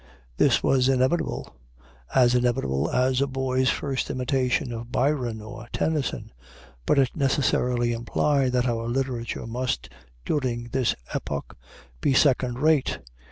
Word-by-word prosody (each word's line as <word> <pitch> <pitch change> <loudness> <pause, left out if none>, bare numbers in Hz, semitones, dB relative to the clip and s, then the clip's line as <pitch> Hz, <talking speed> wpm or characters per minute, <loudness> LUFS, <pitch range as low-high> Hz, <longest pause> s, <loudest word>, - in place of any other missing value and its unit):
This - - +3
was 130 -1 +3
inevitable; 130 - 0 0.6
as 125 -2 +5
inevitable 80 - +1
as 130 +1 +2
a 140 - +2
boy's 130 -1 0
first 135 -2 -2
imitations 130 +1 0
of 115 +1 -7
Byron 125 -5 0
or 115 +1 -9
Tennyson. 155 -4 -2 0.6
But - - +3
it 135 -3 +2
necessarily 125 -4 +1
implied 130 +3 +1
that 125 0 +2
our 115 -1 -1
literature 120 -2 -2
must, 120 - -3 0.4
during 120 -4 -1
this 130 -1 +1 0.2
epoch, 70 -1 -4 0.5
be 135 - +2
second 125 -3 +3
rate. 150 0 +2
125 Hz, 125 wpm, -25 LUFS, 120-135 Hz, 0.6 s, as